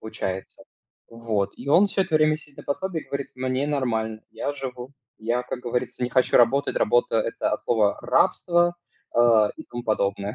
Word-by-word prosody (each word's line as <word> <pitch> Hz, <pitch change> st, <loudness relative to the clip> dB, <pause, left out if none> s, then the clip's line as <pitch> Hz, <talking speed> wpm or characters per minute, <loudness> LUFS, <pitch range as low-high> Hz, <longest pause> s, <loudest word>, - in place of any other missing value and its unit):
получается, 95 Hz, -3 st, -6 dB, 0.4 s
вот. 110 Hz, -4 st, -2 dB
И 125 Hz, -, -9 dB
он 185 Hz, +8 st, +6 dB
всё 195 Hz, -, -1 dB
это 170 Hz, -4 st, +1 dB
время 155 Hz, 0 st, +3 dB
сидит 150 Hz, -2 st, -15 dB
на -, -, -8 dB
пособии 165 Hz, +4 st, -2 dB
и -, -, -18 dB
говорит: 140 Hz, 0 st, -4 dB
"Мне 130 Hz, +2 st, -1 dB
нормально, 110 Hz, -6 st, -1 dB
я 145 Hz, -, -3 dB
живу. 130 Hz, -1 st, -7 dB, 0.3 s
Я, 120 Hz, +3 st, -1 dB
как 125 Hz, -, -5 dB
говорится, 125 Hz, +1 st, -3 dB
не 125 Hz, -, -3 dB
хочу 130 Hz, 0 st, +3 dB
работать. 130 Hz, +4 st, +3 dB
Работа- 120 Hz, 0 st, +2 dB
это 115 Hz, -, -2 dB
от -, -, -2 dB
слова 110 Hz, -4 st, +2 dB
рабство, 175 Hz, 0 st, +2 dB, 0.4 s
а, 115 Hz, -3 st, +5 dB
и -, -, -8 dB
тому 120 Hz, 0 st, -7 dB
подобное". 100 Hz, -1 st, -1 dB
125 Hz, 180 wpm, -24 LUFS, 110-140 Hz, 0.4 s, он